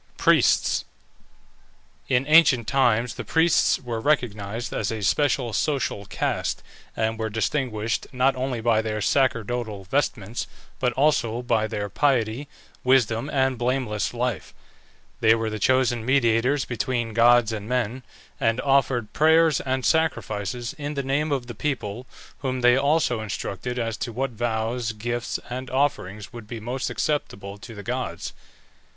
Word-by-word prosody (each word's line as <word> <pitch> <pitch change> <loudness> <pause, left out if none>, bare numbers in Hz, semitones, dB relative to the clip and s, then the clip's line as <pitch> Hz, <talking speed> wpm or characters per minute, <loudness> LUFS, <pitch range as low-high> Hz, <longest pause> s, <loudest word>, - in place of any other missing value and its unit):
PRIESTS. - - +3 1.3
In 130 0 +2
ancient 145 -7 +5
times 120 -3 +2
the - - -6
priests 165 +1 +3
were 120 -3 -4
recognized 115 -5 -1
as 105 - -1
a 110 -2 -4
special 130 -1 +1
social 135 -9 -1
caste, - - -2 0.3
and 110 0 -1
were 110 0 -1
distinguished 115 -1 -1
not 130 +1 +2
only 130 -2 -2
by 110 -1 +3
their 110 -1 -3
sacerdotal 115 -3 0
vestments, 110 -1 -2 0.3
but 125 -1 +1
also 125 -4 +1
by 115 -3 +1
their 105 -2 -3
piety, 125 +2 0 0.4
wisdom, 125 0 +2
and 130 -3 +1
blameless 120 -4 -1
life. 120 -6 -3 0.6
They 110 0 +5
were 110 -1 -2
the 110 - -4
chosen 125 -1 +2
mediators 125 +1 +2
between 120 0 -2
gods 120 0 +5
and 105 0 -5
men, 125 0 -1 0.4
and 115 +1 +1
offered 135 -5 +1
prayers 160 -1 +4
and 130 -1 -2
sacrifices 120 -7 0
in 145 +1 -4
the 140 - -2
name 145 +3 0
of 135 -3 -1
the 120 - -7
people, 120 -2 -3 0.3
whom 130 -2 -2
they 125 0 +6
also 140 -4 +2
instructed 110 +3 -4
as 115 -2 -2
to 120 - -4
what 130 +3 -2
vows, 115 +1 -2
gifts, 120 +2 -3
and 130 +1 -5
offerings 120 -6 -1
would 115 -3 -9
be 115 +1 -6
most 125 +4 -3
acceptable 100 -9 -3
to 115 +2 -10
the 100 - -8
gods. 125 +3 -4
120 Hz, 145 wpm, -24 LUFS, 110-130 Hz, 1.3 s, they